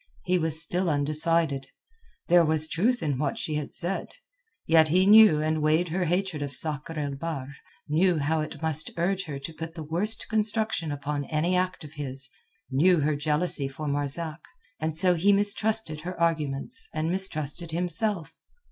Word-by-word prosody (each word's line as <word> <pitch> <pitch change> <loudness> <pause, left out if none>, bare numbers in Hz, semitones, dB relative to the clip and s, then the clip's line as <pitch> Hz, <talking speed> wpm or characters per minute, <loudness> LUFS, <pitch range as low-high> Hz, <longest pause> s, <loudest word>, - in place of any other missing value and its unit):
He 180 0 +1
was 160 -1 -2
still 175 +2 -1
undecided. 150 -1 +1 0.6
There 175 0 +5
was 155 -1 +2
truth 220 +9 0
in 145 -4 -1
what 145 -1 -1
she 155 - -3
had 150 -1 -4
said; 180 +2 -3 0.6
yet 160 -1 +5
he 180 +4 +3
knew 210 -6 +7
and 155 0 -1
weighed 155 +3 +2
her 180 +3 -1
hatred 180 -2 -1
of 140 -2 -4
Sakr 155 +2 -3
el 145 -2 -3
Bahr, 140 -2 -5 0.3
knew 170 +3 +2
how 155 +2 0
it 155 - -7
must 155 -1 +1
urge 190 +3 -1
her 145 -4 -6
to 140 +4 -8
put 165 +1 -8
the 160 - -6
worst 185 +9 -1
construction 215 -6 0
upon 145 0 -4
any 165 +5 0
act 185 -1 -1
of 150 0 -11
his, 135 -3 -4 0.4
knew 165 +5 +3
her 150 +1 +1
jealousy 150 0 0
for 145 +3 -7
Marzak, 150 +3 -3 0.4
and 160 0 -2
so 180 +1 +5
he 180 +4 +3
mistrusted 205 -4 +1
her 180 +2 -7
arguments 165 - +4
and 160 +1 -1
mistrusted 170 -3 -2
himself. 180 +2 -2
160 Hz, 170 wpm, -26 LUFS, 150-180 Hz, 0.6 s, knew